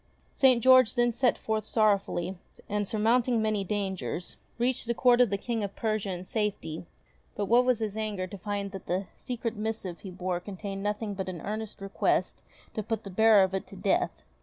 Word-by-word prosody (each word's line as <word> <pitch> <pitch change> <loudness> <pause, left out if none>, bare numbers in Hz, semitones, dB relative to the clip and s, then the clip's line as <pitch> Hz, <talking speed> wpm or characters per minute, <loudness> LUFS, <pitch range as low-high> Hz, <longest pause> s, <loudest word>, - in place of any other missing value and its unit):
St. 255 -4 +4
George 255 -2 +6
then 240 -1 +3
set 250 +2 +2
forth 220 -1 -2
sorrowfully, 200 -4 +1 0.3
and 205 -1 -1
surmounting 230 +3 +2
many 215 -2 0
dangers, 190 -3 -3 0.2
reached 240 0 0
the 235 - 0
Court 245 0 +5
of 245 - +5
the 200 - 0
King 225 +1 -2
of 200 -1 -4
Persia 215 -3 -1
in 180 0 -5
safety; 190 -7 -3 0.5
but 205 - -1
what 240 +4 +4
was 250 -2 +3
his 215 -2 -2
anger 210 -4 -2
to 190 +2 -8
find 200 0 -3
that 195 -1 -9
the 185 +3 -1
secret 235 -2 -4
missive 210 -5 -4
he 195 - -8
bore 180 -1 -2
contained 195 +1 -6
nothing 210 +1 -2
but 190 -1 -4
an 180 -2 -5
earnest 215 0 -5
request 195 0 0 0.3
to 215 - -2
put 220 +1 -3
the 195 - -8
bearer 220 +1 +6
of 190 0 -1
it 190 - -3
to - - -11
death. - - 0
210 Hz, 195 wpm, -28 LUFS, 195-225 Hz, 0.5 s, George